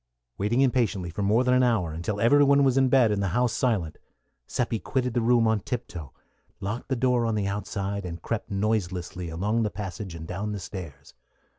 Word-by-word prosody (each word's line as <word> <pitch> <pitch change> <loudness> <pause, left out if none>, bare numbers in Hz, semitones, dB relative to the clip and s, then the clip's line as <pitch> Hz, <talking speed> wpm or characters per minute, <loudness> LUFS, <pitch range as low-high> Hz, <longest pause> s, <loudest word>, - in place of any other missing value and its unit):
Waiting 110 +6 +1
impatiently 115 -9 +1
for 100 - -4
more 105 +5 +3
than 125 0 +2
an 125 - +4
hour, 110 -10 +1
until 85 +6 -3
every 145 +7 +5
one 140 0 +5
was 135 -2 +3
in 135 -1 +4
bed 125 -4 +5
and 100 -1 0
the 100 - 0
house 125 -2 +2
silent, 100 -11 -1 0.5
Seppi 115 -3 -1
quitted 125 0 -1
the 120 - +1
room 115 0 +4
on 110 -1 +2
tiptoe, 90 - -6 0.5
locked 105 +7 -4
the 130 - +1
door 125 -1 +2
on 115 - 0
the 105 -2 0
outside, 100 0 -3
and 85 -1 -6
crept 115 +6 -4
noiselessly 95 -4 -2
along 105 +8 0
the 110 - +1
passage 95 -3 -6
and 80 -1 -7
down 105 +4 -3
the 100 - -4
stairs. 85 -7 -9
105 Hz, 200 wpm, -26 LUFS, 95-120 Hz, 0.5 s, every